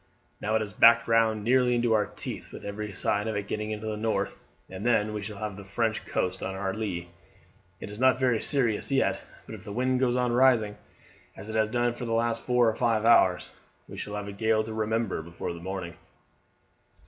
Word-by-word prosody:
Now 110 +1 0
it 110 - +2
has 105 -2 -5
backed 115 0 +6
round 110 -2 +2
nearly 125 +1 +3
into 120 -1 +2
our 105 -1 +2
teeth, - - -7
with - - -10
every 105 +1 -5
sign 105 +3 -1
of 110 - -2
its 100 0 -3
getting 105 0 -3
into 110 0 -5
the 110 -1 -2
north, 105 -2 -2 0.3
and 95 +2 -8
then 110 -3 +2
we 105 - -3
shall 105 0 -7
have 105 -1 -4
the 100 - -9
French 110 +3 -2
coast 90 0 -2
on 95 - -4
our 95 0 -2
lee. 95 -5 -4 0.7
It's 105 +1 -8
not 130 0 +4
very 125 -4 +2
serious 125 -5 +1
yet, 135 - +1 0.2
but - - -9
if 110 -2 -9
the 105 - -8
wind 125 +3 0
goes 125 -2 +2
on 125 -1 +1
rising 120 -4 +3 0.6
as 100 +3 -9
it 110 - -5
has 110 -1 +2
done 120 +1 +1
for 120 - -6
the 115 - -2
last 115 0 0
four 125 -1 +3
or 110 - +1
five 115 -3 +1
hours 95 -6 +4 0.4
we - - -10
shall 105 - -5
have 105 -1 -5
a - - -5
gale 110 +2 +1
to 110 0 -6
remember 110 -3 -1
before 85 +1 -6
the 85 - -9
morning." 95 -2 -5
110 Hz, 220 wpm, -27 LUFS, 100-120 Hz, 0.7 s, backed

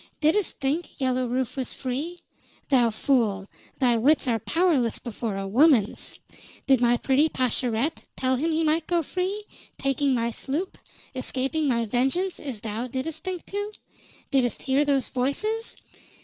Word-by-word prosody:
"Didst 325 +5 +2
think 290 +5 -2
Yellow 255 -1 +1
Rufe 250 0 -2
was 260 -3 -3
free? 285 +7 -4 0.5
Thou 250 -4 +4
fool! 215 -4 +1 0.3
Thy 245 -3 +3
wits 275 +5 +3
are 230 -2 +2
powerless 295 - +2
before 225 -3 -4
a 195 0 -3
woman's. 240 -1 +3 0.5
Did 265 -3 +4
my 240 0 +4
pretty 275 +5 +3
Pascherette 255 +2 -1
tell 260 0 +1
him 305 +6 0
he 320 +1 +1
might 315 +1 +1
go 345 -1 +1
free, 375 +6 -2 0.3
taking 275 0 +1
my 235 0 0
sloop, 300 - -3 0.3
escaping 265 +4 -1
my 235 -3 +1
vengeance, 270 - 0
as 255 -8 -5
thou 225 +3 -3
didst 265 +6 -4
think 370 -2 -4
to? 410 +1 -4 0.6
Didst 250 -5 +1
hear 270 +2 +3
those 280 -2 +1
voices? 425 - -1
265 Hz, 150 wpm, -26 LUFS, 245-315 Hz, 0.6 s, Thou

